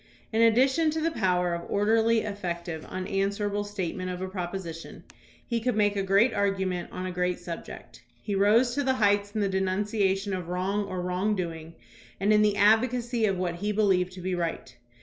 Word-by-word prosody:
'* - - -32
In 225 - +2
addition 265 +8 +4
to 320 +1 -2
the 330 +1 0
power 180 - +1
of 170 0 -5
orderly, 225 +2 +3
effective, 175 -5 -5
un 185 0 -4
answerable 200 +1 -1
statement 185 -3 -4
of 180 0 -4
a 190 - -3
proposition, 175 -3 -6 0.4
he 235 -1 -1
could 245 0 -1
make 205 -1 +2
a 200 - 0
great 195 +6 +3
argument 190 -3 -1
on 185 - -5
a 185 - -3
great 180 0 -1
subject. 170 -1 -9 0.2
He 205 - -4
rose 215 +5 +4
to 285 - 0
the 265 -1 +1
heights 205 -3 +2
in 215 - 0
the 200 - +2
denunciation 195 +1 0
of 180 -2 -4
wrong 190 +3 -1
or 185 -2 -4
wrong 185 +4 0
doing 165 -3 -5 0.4
and 200 +2 +3
in 210 - +5
the 210 -1 +2
advocacy 235 +2 +3
of 195 -2 0
what 175 -2 -2
he 205 +4 -2
believed 190 -4 +2
to 185 - -9
be 185 +1 -2
right. 165 -7 -3
195 Hz, 195 wpm, -27 LUFS, 180-215 Hz, 0.4 s, in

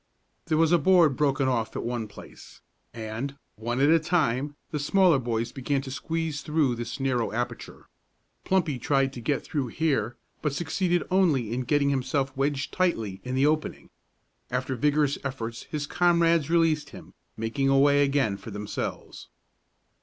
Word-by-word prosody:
There 155 -2 +1
was 165 0 +3
a 175 - +5
board 165 -3 +5
broken 140 -1 +1
off 115 -4 -1
at - - -3
one 120 -2 -3
place, 105 - -14 0.3
and, 115 +5 -5 0.2
one 120 +3 -3
at 145 +3 +5
a 165 - +6
time, 150 -5 0 0.2
the 150 - -2
smaller 175 0 +4
boys 120 -1 -2
began 135 +1 -2
to 130 - -7
squeeze 160 +1 -3
through 150 -4 +1
this 120 +3 -5
narrow 130 -3 0
aperture. 120 +3 -5 0.6
Plumpy 165 -8 +1
tried 135 +1 +1
to 120 - -7
get 140 +4 -1
through 145 -7 -2
here, 120 -5 -1 0.2
but 150 -3 -1
succeeded 175 +2 0
only 150 - +2
in 125 - -1
getting 145 +1 +2
himself 135 0 -1
wedged 140 +1 -1
tightly 115 - -1
in 125 +1 -3
the 135 +2 +3
opening. 155 +1 -1 0.6
After 130 +1 -2
vigorous 145 +2 +1
efforts 115 -4 -5
his 150 -2 -3
comrades 170 -2 +2
released 160 -4 +2
him, - - -12 0.2
making 115 +5 0
a 135 - +4
way 145 +1 +5
again 135 -8 +1
for 100 +3 -10
themselves. 105 0 -5
140 Hz, 160 wpm, -26 LUFS, 120-155 Hz, 0.6 s, a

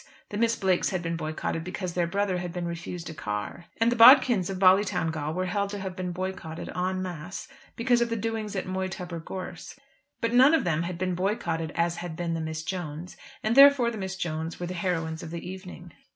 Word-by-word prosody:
The 205 - -4
Miss 230 +1 +2
Blakes 185 -2 +1
had 185 -2 -2
been 165 0 -2
boycotted 155 0 -3
because 180 0 -4
their 175 -1 +1
brother 195 0 0
had 175 -1 -4
been 175 0 -4
refused 170 0 -5
a - - -8
car. 105 +6 -5
And 230 +1 +4
the - - +1
Bodkins 240 - +7
of 195 - -3
Ballytowngal 180 -5 +2
were 185 0 -1
held 200 +2 -1
to 205 - -5
have 190 -1 -5
been 185 -1 -3
boycotted 180 -3 -5
en 185 +1 -1
masse 175 +1 -6 0.3
because 240 0 +2
of 235 - +1
the 230 - -1
doings 220 -2 -3
at 190 - -2
Moytubber 185 -2 -4
gorse. 185 +2 -7 0.4
But 230 0 -1
none 265 +6 +7
of - - +1
them 160 -2 +1
had 170 0 -3
been 185 0 -1
boycotted 175 -4 -1
as 170 0 +1
had 175 -2 -5
been 170 0 -2
the 165 - -2
Miss 160 0 -4
Jones'; 175 -1 -5 0.3
and 220 +2 +1
therefore 275 -3 +7
the 220 - -6
Miss 190 -1 -4
Jones' 165 -2 -4
were 175 - -3
the 180 - -4
heroines 165 -3 -2
of 165 - -7
the 170 +1 -6
evening. 180 -2 -9
180 Hz, 215 wpm, -27 LUFS, 170-200 Hz, 0.4 s, Bodkins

